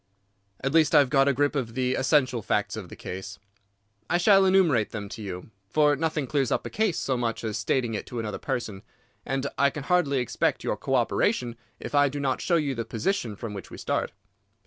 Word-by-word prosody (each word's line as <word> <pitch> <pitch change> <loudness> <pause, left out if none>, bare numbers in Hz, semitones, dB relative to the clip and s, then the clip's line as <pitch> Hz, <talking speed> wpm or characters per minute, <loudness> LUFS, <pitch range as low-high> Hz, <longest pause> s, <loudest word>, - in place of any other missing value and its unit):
"At 135 +2 -1
least 160 -1 +4
I - - +9
have 140 -3 +4
got 135 -1 +4
a - - +5
grip 145 +3 +1
of 115 -5 -3
the 130 0 +1
essential 130 -4 +2
facts - - -1
of - - -7
the - - -9
case. 95 +1 -7 0.7
I 175 - +3
shall 195 +2 +5
enumerate 175 - +3
them 105 -2 -6
to 115 - -8
you, 95 0 -7 0.2
for 150 +6 +3
nothing 155 0 -1
clears 135 -1 0
up - - 0
a - - -5
case 215 -5 0
so 135 - -1
much 120 -2 -2
as 110 -2 -2
stating 120 -4 0
it 105 - -4
to 120 - -5
another 105 -3 -4
person, 120 -7 -4 0.5
and 135 0 -1
I 140 - +5
can 145 0 -7
hardly 150 -4 +2
expect 125 -3 0
your - - -1
co - - -2
operation 120 -2 +1 0.2
if - - -7
I 145 -1 +4
do 145 +2 -5
not 135 -2 -1
show 175 - +1
you 150 -4 +1
the 115 -2 -3
position 115 - -2
from 105 +1 -6
which 100 -3 -8
we - - -10
start." - - -2
135 Hz, 220 wpm, -26 LUFS, 115-150 Hz, 0.7 s, I